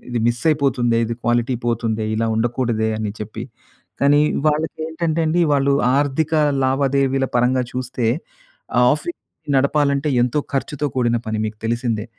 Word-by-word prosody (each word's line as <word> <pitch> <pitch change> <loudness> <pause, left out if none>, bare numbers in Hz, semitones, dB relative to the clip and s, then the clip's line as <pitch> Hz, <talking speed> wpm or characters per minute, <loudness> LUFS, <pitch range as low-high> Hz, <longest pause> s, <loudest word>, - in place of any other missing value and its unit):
ఇది 120 -1 -2
మిస్ 120 0 0
అయిపోతుందే, 130 -6 +1
ఇది 115 +1 -3
క్వాలిటీ 120 +1 +1
పోతుందే, 115 -2 -1
ఇలా 115 +1 0
ఉండకూడదే 115 -1 0
అని 110 -1 -2
చెప్పి. 105 0 -6 0.6
కానీ 145 +1 +4 0.3
వాళ్ళకి 155 +2 0
ఏంటంటే 160 0 -1
అండి. 170 +3 +2
వాళ్ళు 140 0 +2 0.3
ఆర్థిక 145 +2 0 0.3
లావాదేవీల 135 0 +1
పరంగా 125 +1 +2
చూస్తే 125 -2 -3 0.9
ఆఫీస్ 345 -1 -4 0.4
నడపాలంటే 140 +1 +2
ఎంతో 125 +4 0
ఖర్చుతో 145 +2 -2
కూడిన 120 -2 +2
పని 110 0 -2
మీకు 105 0 -6
తెలిసిందే. 115 -2 -1
130 Hz, 135 wpm, -20 LUFS, 115-140 Hz, 0.9 s, కానీ